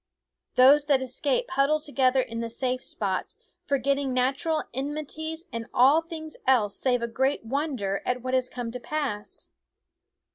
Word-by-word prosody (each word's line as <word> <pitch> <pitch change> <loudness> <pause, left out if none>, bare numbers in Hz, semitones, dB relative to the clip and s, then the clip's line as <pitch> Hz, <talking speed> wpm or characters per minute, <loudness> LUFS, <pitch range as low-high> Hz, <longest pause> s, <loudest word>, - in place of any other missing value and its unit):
Those 280 +3 +7
that 285 -3 +3
escape 270 - -1
huddle 305 -1 +2
together 270 -3 +2
in 230 -2 -5
the 230 0 -3
safe 255 +2 -1
spots, 190 -3 -3 0.3
for 280 - +2
getting 275 0 0
natural 270 +5 +1
enmities 310 +4 -4
and 230 0 -4
all 270 +6 +6
things 320 -2 -8
else 215 -6 +3
save 245 -2 +1
a - - 0
great 265 +2 0
wonder 255 -7 -2
at 250 -1 -2
what 255 0 -3
has 255 -1 +2
come 245 -2 -5
to 250 - -5
pass. 260 -6 -4
265 Hz, 155 wpm, -26 LUFS, 245-295 Hz, 0.3 s, Those